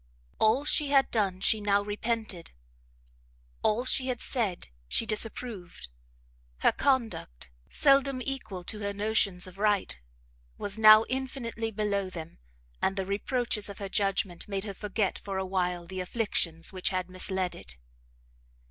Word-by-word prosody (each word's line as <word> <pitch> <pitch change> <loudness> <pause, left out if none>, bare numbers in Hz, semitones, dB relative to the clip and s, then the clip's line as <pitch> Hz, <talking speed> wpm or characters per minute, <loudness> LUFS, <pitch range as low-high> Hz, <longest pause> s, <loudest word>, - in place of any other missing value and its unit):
All 230 +6 +4
she 300 0 +3
had 275 -1 +4
done 195 -5 0
she 215 +1 +3
now 200 0 +2
repented, 210 -3 -3 1.1
all 225 +4 +1
she 260 0 +3
had 250 -2 -1
said 205 - -1 0.2
she 225 - 0
disapproved; 215 - -4 0.7
her - - +5
conduct, 225 - -1 0.2
seldom 275 -2 +3
equal 255 -8 -4
to 210 +4 -3
her 200 -1 -2
notions 200 -3 +1
of 185 +1 -11
right, 205 - +1 0.6
was 205 +1 -2
now 215 0 +9
infinitely 250 -3 -3
below 200 -3 -1
them, 165 - -9 0.4
and 190 - +1
the 195 -1 -2
reproaches 210 +2 -1
of 200 - -8
her 200 -1 -5
judgment 195 -3 0
made 195 -2 -2
her 205 -2 -5
forget 205 0 -1
for 195 -1 -4
a 190 - -1
while 180 -2 -1
the 185 +2 -6
afflictions 180 -4 -1
which 185 -1 -1
had 185 -2 -2
misled 185 0 -2
it. 60 -1 -9
205 Hz, 145 wpm, -29 LUFS, 185-230 Hz, 1.1 s, now